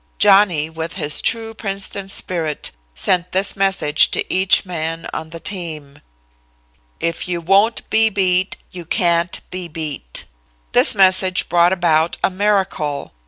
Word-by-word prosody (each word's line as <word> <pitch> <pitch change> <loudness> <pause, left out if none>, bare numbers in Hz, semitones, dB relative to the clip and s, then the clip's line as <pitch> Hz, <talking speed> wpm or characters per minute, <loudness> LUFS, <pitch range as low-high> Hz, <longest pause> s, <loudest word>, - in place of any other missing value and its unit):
Johnny, 195 -7 +4
with 160 +1 -6
his 150 -5 0
true 225 -1 -1
Princeton 195 -2 -5
spirit, 165 -6 -3 0.2
sent 180 -1 0
this 195 +2 0
message 195 -7 +3
to - - -3
each 190 +2 +3
man 165 -2 -4
on 160 - -5
the 165 +1 -9
team: 160 -7 -6 1.0
"'If 170 +1 -3
you 175 -1 -2
won't 195 +7 +1
be 220 0 +4
beat, 190 -2 0
you 180 -1 -8
can't 170 -1 0
be 180 -1 -6
beat.'" 150 - -4 0.5
"This - - +6
message 185 -1 +4
brought 175 0 +4
about 170 -3 +1
a - - +2
miracle. 190 -7 -1
180 Hz, 135 wpm, -18 LUFS, 165-195 Hz, 1.0 s, This